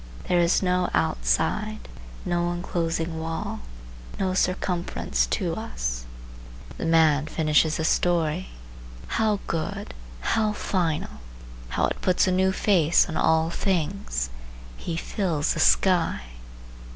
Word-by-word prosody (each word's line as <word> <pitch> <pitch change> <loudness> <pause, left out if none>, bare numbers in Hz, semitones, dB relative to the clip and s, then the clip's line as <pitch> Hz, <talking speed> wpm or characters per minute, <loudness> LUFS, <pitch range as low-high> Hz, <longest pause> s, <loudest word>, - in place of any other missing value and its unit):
There 180 - +3
is 170 +2 +3
no 180 -1 +1
outside, 80 - 0 0.4
no 175 0 0
inclosing 165 -2 -2
wall, 160 0 -4 0.6
no 185 -1 0
circumference 180 - 0
to - - -1
us. - - -4 0.7
The - - -2
man 160 -2 +4
finishes 155 0 +2
his 160 - 0
story,—how 155 - -1
good! 155 - -3 0.3
how 215 - +1
final! 170 - -2 0.5
how - - +1
it - - -3
puts 185 - +3
a 185 - +1
new 190 +1 +3
face 180 -5 +3
on 160 - -5
all 160 +1 +2
things! 175 - -1 0.4
He 165 - -4
fills 165 -5 -1
the - - -4
sky. 175 - +3
165 Hz, 115 wpm, -25 LUFS, 150-185 Hz, 0.7 s, man